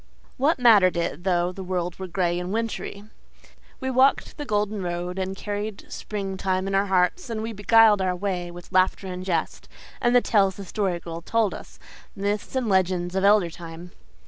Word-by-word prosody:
What 290 +5 +2
mattered 210 -8 +5
it 170 0 -3
though 175 -1 +1
the 190 +1 -8
world 180 -1 -3
were 190 - -5
gray 175 0 0
and 180 +1 -4
wintry? 225 -2 -3 0.8
We 260 0 -2
walked 260 +2 +3
the 295 - -6
golden 210 -2 -1
road 175 +1 -3
and 190 0 -3
carried 205 +1 -5
spring 195 -2 -5
time 185 0 -1
in 195 - -3
our 195 +1 +2
hearts, 190 - +1
and 220 -1 -3
we 225 0 -4
beguiled 210 0 +5
our 185 -1 0
way 180 -2 -3
with 175 +1 -12
laughter 185 +1 +2
and 185 -1 -5
jest, 180 -3 -2 0.3
and 240 +1 +3
the - - +8
tales 195 -5 +2
the 200 - -8
Story 190 -3 -1
Girl 165 0 -7
told 220 +2 +1
us - - -11 0.4
myths 205 +5 -3
and 255 -3 0
legends 185 -2 +1
of 190 0 0
elder 200 -4 +4
time. 170 +1 -10
190 Hz, 190 wpm, -24 LUFS, 180-210 Hz, 0.8 s, the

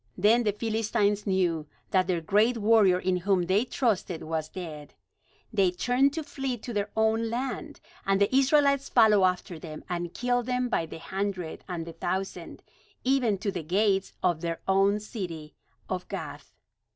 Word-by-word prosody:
Then 215 +5 +4
the 215 -3 +1
Philistines 215 -1 0
knew 175 -5 +1 0.2
that 185 -2 +3
their 175 -3 0
great 215 +8 +3
warrior 210 -4 +5
in 185 0 0
whom 185 0 +1
they 190 +5 +2
trusted 205 -10 -1
was 155 -1 -3
dead. 155 -5 -8 0.6
They 195 -4 +4
turned 245 +9 +2
to 320 0 -3
flee 270 -3 -3
to 235 +2 -7
their 205 -1 -1
own 220 +1 +2
land; 245 0 -4 0.2
and 195 0 +2
the 200 +5 +2
Israelites 280 0 +3
followed 210 -3 +5
after 180 -2 -1
them, 155 -1 -8
and 175 -1 -3
killed 245 +1 -1
them 250 0 0
by 165 -8 0
the - - -8
hundred 190 -1 -4
and 170 -2 -4
the 165 - -8
thousand, 190 +3 -4 0.4
even 250 -6 +2
to 200 +1 -2
the 180 -3 -4
gates 195 +4 +1
of 175 -3 +1
their 170 -1 -3
own 195 +2 +3
city 175 -8 -6 0.3
of - - -4
Gath. - - -7
200 Hz, 165 wpm, -27 LUFS, 180-230 Hz, 0.6 s, warrior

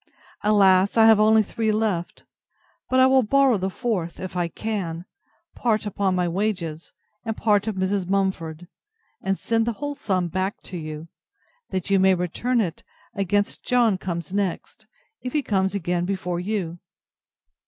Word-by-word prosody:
Alas! 200 -1 +4
I 225 - +7
have 220 -1 +7
only 215 +1 +5
three 220 +2 -1
left; 210 -5 -1 0.7
but 255 - +3
I 260 - +7
will 265 0 +5
borrow 265 0 +3
the 190 0 -2
fourth, 190 -6 -3
if 185 -1 -6
I 175 -1 0
can, 180 -4 -4 0.5
part 220 -3 0
upon 195 -2 0
my 180 -1 +1
wages, 170 -4 -3 0.3
and 225 -1 -4
part 210 -1 +2
of 220 - -1
Mrs. 190 -1 -1
Mumford, 180 -4 -1 0.5
and 195 0 -1
send 225 0 0
the 235 - 0
whole 290 +5 -4
sum 185 -9 -1
back 185 +4 -2
to 185 - -6
you, 155 0 -7 0.6
that 185 +1 -3
you 195 - +5
may 190 0 +5
return 205 +8 -1
it, 175 -7 -2 0.3
against 205 +1 0
John 235 -6 +2
comes 170 -2 -5
next, 200 -4 -3 0.3
if 250 - -5
he 295 - +1
comes 190 -3 0
again 175 -2 -1
before 180 -2 -2
you. 180 -3 -3
195 Hz, 160 wpm, -24 LUFS, 180-220 Hz, 0.7 s, I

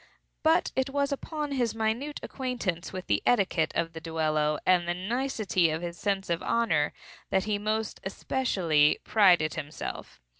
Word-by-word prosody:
But 325 +2 +3
it 265 +1 +1
was 280 +1 0
upon 295 +1 -3
his 245 -5 0
minute 225 +7 -1
acquaintance 240 -10 -3
with 185 -1 -6
the - - +1
etiquette 195 -8 +2
of 165 0 -1
the 160 - -7
duello, 155 -2 0
and 180 -2 +3
the 175 - 0
nicety 205 -3 0
of 160 +2 -3
his 170 0 -4
sense 195 +1 -1
of 170 -1 -1
honor, 165 -11 +1 0.4
that 190 -1 +2
he 210 -1 -1
most 215 +1 -2
especially 185 - +1
prided 180 -8 +4
himself. 155 -3 -6
195 Hz, 155 wpm, -28 LUFS, 165-245 Hz, 0.4 s, prided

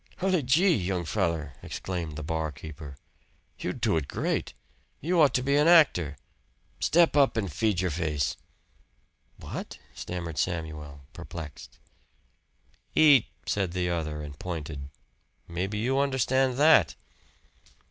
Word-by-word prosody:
"Hully 185 -2 +1
gee, 165 +9 +4
young 90 -3 -1
feller!" 85 -7 -1
exclaimed 85 -5 -5
the 80 - -6
bar 80 0 -2
keeper. 75 -1 -10 0.6
"You - - -2
do - - 0
it 75 -3 -2
great. - - -2 0.4
You 170 +3 +2
ought 140 -4 +4
to 125 - +1
be 140 +2 +2
an 150 +2 +4
actor. 90 - +5 0.6
Step 170 -1 +3
up 140 -5 +4
and 100 -8 -2
feed 100 +2 +1
your 90 -2 0
face." 75 -3 -1 1.0
"What?" - - -7 0.2
stammered 85 -3 -5
Samuel, 75 -5 -3
perplexed. 80 -4 -9 1.2
"EAT!" 145 -7 +6 0.2
said 95 -4 -1
the 90 -1 -1
other, 75 -3 -3
and 75 -1 -9
pointed. 75 -5 -5 0.6
"Maybe 95 +5 -3
you 130 +5 +1
understand 130 -1 +1
that." 155 +3 +5
90 Hz, 125 wpm, -27 LUFS, -, 1.2 s, EAT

